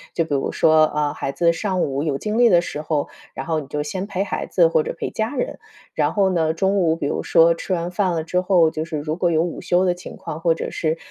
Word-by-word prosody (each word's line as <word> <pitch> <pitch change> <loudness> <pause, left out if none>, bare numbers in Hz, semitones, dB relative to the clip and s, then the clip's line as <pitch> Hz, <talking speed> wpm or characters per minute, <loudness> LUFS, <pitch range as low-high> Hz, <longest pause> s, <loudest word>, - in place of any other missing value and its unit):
就 165 - +1
比 155 - -4
如 135 - 0
说， 155 -1 +4
啊， 150 -1 -1
孩 135 - -3
子 170 +3 +2
上 185 +1 -1
午 135 0 -2
有 145 -3 -1
精 215 +8 -2
力 240 -1 +6
的 175 -4 +6
时 150 -3 -4
候， 155 -2 -1 0.3
然 135 - -5
后 160 -1 0
你 145 - -8
就 150 +1 -3
先 185 +6 -4
陪 195 -2 -1
孩 200 - -4
子 175 -3 +4
或 160 -1 +2
者 - - -5
陪 - - -4
家 220 +5 -2
人。 - - -3 0.3
然 - - +1
后 195 -2 +2
呢， 160 -2 +1
中 190 +4 +1
午 165 -3 +2
比 165 - -4
如 - - -1
说 165 0 +4
吃 175 +3 -4
完 175 0 -2
饭 185 -2 0
了 160 - -1
之 180 +3 0
后， 180 -4 +3
就 155 - -3
是 160 -1 -5
如 150 +1 -3
果 175 0 +1
有 160 0 +2
午 175 - -5
休 180 +1 +2
的 180 - +2
情 175 - -10
况， 155 - -6
或 165 -1 +2
者 - - -5
是， 160 0 -1
165 Hz, 295 characters per minute, -21 LUFS, 155-185 Hz, 0.3 s, 力